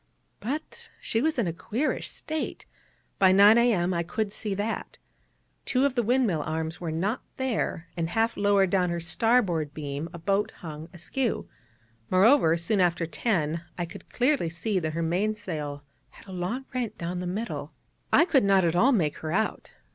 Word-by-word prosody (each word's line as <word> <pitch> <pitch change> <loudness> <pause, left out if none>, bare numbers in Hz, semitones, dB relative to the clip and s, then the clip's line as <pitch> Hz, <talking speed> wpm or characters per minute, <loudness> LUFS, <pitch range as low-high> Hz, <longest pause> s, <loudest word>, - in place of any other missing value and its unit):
But 285 +8 -5
she 225 - -1
was 315 +1 +1
in 235 - +2
a 170 - -2
queerish 235 - -2
state: 315 0 -4 0.5
by 190 -1 +6
9 200 +3 +8
A.M. 190 -7 +2
I 170 - 0
could 205 +4 -2
see 210 -2 -3
that. 210 +3 -3 0.7
Two 260 +1 +2
of 280 - +1
the 245 - +1
windmill 235 - +2
arms 160 +2 -3
were 170 - -3
not 190 +9 -1 0.2
there, 240 -10 -2
and 165 -1 -2
half 225 +5 +1
lowered 200 -2 +3
down 180 -2 +2
her 170 0 -2
starboard 175 -5 +1
beam 145 +1 -4
a 170 - -8
boat 195 +4 0
hung 155 0 -7
askew; 220 +7 -2 0.6
moreover, 185 - +5
soon 190 +4 +1
after 175 -1 +2
10 165 -3 -1 0.2
I 175 - -1
could 165 - -12
clearly 255 - +1
see 185 +4 -1
that 155 -2 -3
her 165 +1 -1
main 190 +6 0
sail 150 -8 -5 0.3
had - - -17
a - - -9
long 185 +9 -3
rent 240 -4 -3
down 175 +1 -3
the 180 - -3
middle. 175 -7 -4 0.4
I 330 - +6
could 275 - +3
not 195 -2 +4
at 165 0 +1
all 240 +10 +5
make 160 -10 +1
her 155 - -5
out. 220 +5 -1
190 Hz, 180 wpm, -27 LUFS, 165-225 Hz, 0.7 s, 9